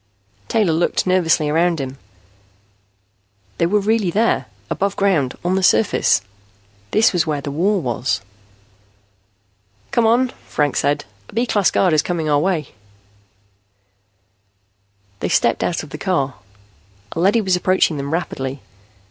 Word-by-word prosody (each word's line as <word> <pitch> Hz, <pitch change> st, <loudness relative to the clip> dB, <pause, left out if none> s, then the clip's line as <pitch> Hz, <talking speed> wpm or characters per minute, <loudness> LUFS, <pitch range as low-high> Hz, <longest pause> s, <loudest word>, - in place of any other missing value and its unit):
Taylor 210 Hz, -8 st, +2 dB
looked 170 Hz, +2 st, 0 dB
nervously 175 Hz, -4 st, +2 dB
around 165 Hz, +2 st, +1 dB
him. 135 Hz, 0 st, -6 dB, 1.6 s
They 170 Hz, -, +3 dB
were 210 Hz, +4 st, +2 dB
really 210 Hz, -1 st, +1 dB
there, 220 Hz, +6 st, +1 dB, 0.2 s
above 200 Hz, 0 st, -1 dB
ground, 165 Hz, -10 st, +1 dB
on 180 Hz, -, +1 dB
the 190 Hz, -, +1 dB
surface. 110 Hz, -, +3 dB, 0.7 s
This 220 Hz, -, +3 dB
was 175 Hz, -3 st, +1 dB
where 150 Hz, -2 st, -1 dB
the 140 Hz, 0 st, -5 dB
war 190 Hz, +7 st, +1 dB
was. 125 Hz, -3 st, -1 dB, 1.7 s
"Come 235 Hz, -2 st, +3 dB
on," 245 Hz, +3 st, +3 dB, 0.2 s
Franks 145 Hz, -2 st, 0 dB
said. 145 Hz, +1 st, 0 dB, 0.2 s
"A -, -, -14 dB
B 235 Hz, +2 st, +2 dB
class 205 Hz, -5 st, +2 dB
guard 180 Hz, -4 st, +2 dB
is 155 Hz, -, +4 dB
coming 165 Hz, -1 st, -2 dB
our 145 Hz, -1 st, +3 dB
way." 160 Hz, -3 st, -1 dB, 2.5 s
They -, -, -2 dB
stepped -, -, +2 dB
out 170 Hz, -, -1 dB
of 150 Hz, -, -12 dB
the -, -, -7 dB
car. 140 Hz, -9 st, 0 dB, 0.8 s
A -, -, -5 dB
leady 195 Hz, +6 st, +3 dB
was 190 Hz, -3 st, +1 dB
approaching 180 Hz, -3 st, +2 dB
them 140 Hz, +1 st, -4 dB
rapidly. 135 Hz, -5 st, -3 dB
175 Hz, 140 wpm, -19 LUFS, 145-195 Hz, 2.5 s, is